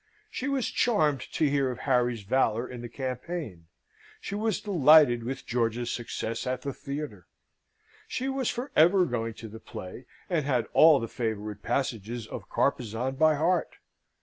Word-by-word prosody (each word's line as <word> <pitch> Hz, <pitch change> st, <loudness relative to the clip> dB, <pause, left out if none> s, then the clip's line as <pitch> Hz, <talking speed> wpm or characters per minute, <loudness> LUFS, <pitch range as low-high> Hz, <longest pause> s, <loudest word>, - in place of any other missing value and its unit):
She 260 Hz, -, -4 dB
was 275 Hz, -3 st, 0 dB
charmed 155 Hz, -, +2 dB
to 155 Hz, -, +2 dB
hear 140 Hz, -2 st, +1 dB
of 125 Hz, -1 st, -6 dB
Harry's 125 Hz, -4 st, +1 dB
valour 115 Hz, +1 st, +1 dB
in 125 Hz, -2 st, -8 dB
the 120 Hz, -, -7 dB
campaign; 130 Hz, -, -5 dB, 0.5 s
she -, -, -6 dB
was 215 Hz, 0 st, 0 dB
delighted 155 Hz, -, +5 dB
with 135 Hz, +3 st, -5 dB
George's 120 Hz, 0 st, -1 dB
success 115 Hz, 0 st, -4 dB
at 125 Hz, 0 st, -2 dB
the 140 Hz, -, -3 dB
theatre; 140 Hz, -, -6 dB, 0.8 s
she 260 Hz, -, -3 dB
was 270 Hz, -2 st, -1 dB
for 250 Hz, +4 st, -4 dB
ever 180 Hz, +4 st, +5 dB
going 115 Hz, -5 st, -3 dB
to 115 Hz, -, -9 dB
the 110 Hz, +1 st, -10 dB
play, 100 Hz, +7 st, -9 dB, 0.2 s
and 170 Hz, -5 st, 0 dB
had 125 Hz, -4 st, +1 dB
all 155 Hz, -3 st, +7 dB
the 115 Hz, -, -4 dB
favourite 105 Hz, -3 st, -4 dB
passages 120 Hz, -2 st, -2 dB
of -, -, -8 dB
Carpezan 120 Hz, +3 st, 0 dB
by 155 Hz, 0 st, +4 dB
heart. 165 Hz, +4 st, 0 dB
130 Hz, 160 wpm, -28 LUFS, 115-155 Hz, 0.8 s, all